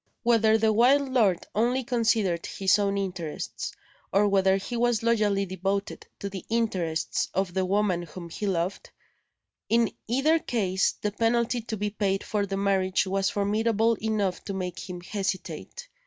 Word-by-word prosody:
Whether 225 -2 +4
the 220 0 +2
wild 265 +5 +4
lord 210 -9 +2
only 245 +4 +1
considered 220 -7 +1
his 195 +1 +2
own 200 -1 +1
interests, 180 -5 -4 0.4
or 205 +2 +4
whether 195 -1 +3
he 220 +5 -5
was 235 -2 +1
loyally 210 -4 +2
devoted 195 +2 -3
to 200 - -5
the 195 -2 -6
interests 185 -8 -1
of 190 -2 0
the 190 0 0
woman 195 -2 +1
whom 175 +1 -9
he 205 +5 -4
loved, 180 0 -2 0.8
in 230 -1 +3 0.2
either 280 +8 +3
case 195 -9 0
the 210 - 0
penalty 235 +2 +1
to 220 -1 -5
be 205 +1 -2
paid 195 -2 -1
for 205 -2 -1
the 195 0 -3
marriage 195 -1 +1
was 195 0 0
formidable 220 +2 +1
enough 210 -4 -1
to 200 - -4
make 180 -2 -4
him 180 -1 -6
hesitate. 200 - -4
200 Hz, 155 wpm, -27 LUFS, 190-225 Hz, 0.8 s, Whether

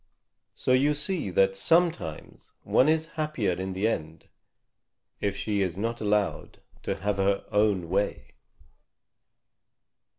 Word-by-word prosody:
So - - -1
you 140 +4 +4
see 150 - -1
that 95 +1 +3
sometimes 165 - 0
one 130 - +3
is 160 0 +2 0.2
happier 150 -11 -1
in 95 +2 -3
the 95 +4 0
end 80 -7 -4 0.9
if 100 -1 -1
she 100 0 -1
is 90 -2 -1
not 115 +3 -3
allowed 105 -1 -1 0.2
to - - -2
have 100 0 -2
her 100 0 +1
own 105 -4 +2
way. 100 +4 -2
105 Hz, 125 wpm, -27 LUFS, 95-130 Hz, 0.9 s, you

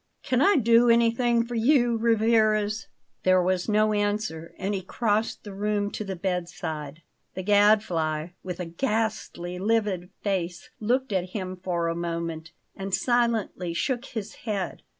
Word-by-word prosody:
"Can 255 0 +1
I 400 +6 +5
do 235 -2 +5
anything 235 0 +3
for 240 - -7
you, 240 0 +3
Rivarez?" 220 -2 +2 0.3
There 185 0 +4
was 180 +2 0
no 215 0 +3
answer, 205 -6 -1
and 195 +2 -2
he 195 - -2
crossed 215 +3 -1
the 205 - -8
room 205 0 -1
to - - -4
the 195 -2 -4
bed 180 -1 -2
side. 155 -3 -6 0.3
The 185 - -4
Gadfly, 185 -6 +3
with 180 -1 -6
a 180 - -3
ghastly, 210 -3 -2
livid 205 -4 0
face, 185 +3 -2
looked 245 +2 0
at 185 -1 -1
him 185 -2 -3
for 180 -2 -2
a 165 - 0
moment, 165 -1 -4 0.2
and 195 -1 -1
silently 230 -8 0
shook 245 +7 -1
his 220 -5 -6
head. 200 -4 -2
205 Hz, 150 wpm, -26 LUFS, 180-225 Hz, 0.3 s, I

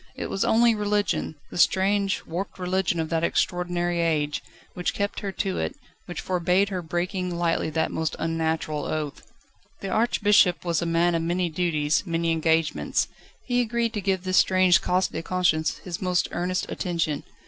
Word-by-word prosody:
It - - -5
was 195 - 0
only 235 +1 +4
religion 205 -5 0 0.2
the - - -5
strange, 195 +2 +2
warped 185 +5 -5
religion 180 -2 0
of 160 -1 -2
that 165 -1 0
extraordinary 175 0 0
age 150 -3 0 0.3
which 180 -1 -2
kept 200 0 -2
her 200 - -4
to 190 -1 -2
it, - - -2 0.3
which 175 - -5
forbade 180 +2 +1
her 185 -2 -3
breaking 180 +2 -2
lightly 170 -2 0
that 160 +1 -1
most 160 0 -2
unnatural 160 -2 -1
oath. 150 -2 -3 0.6
The 195 - -4
Archbishop 205 -5 +3
was 170 -2 +1
a 170 - -1
man 170 +1 +2
of 165 - +1
many 175 +1 0
duties, 155 -3 +1
many 165 0 0
engagements. 160 0 +1 0.4
He 245 -1 +2
agreed 235 -1 -1
to 210 - -2
give 190 -1 0
this 185 0 +1
strange 185 -1 +5
"cas 185 +1 +1
de 160 - -5
conscience" 165 -4 +1
his 175 -2 -5
most 180 -1 +1
earnest 185 +1 -1
attention. 165 -5 -2
175 Hz, 170 wpm, -25 LUFS, 165-190 Hz, 0.6 s, strange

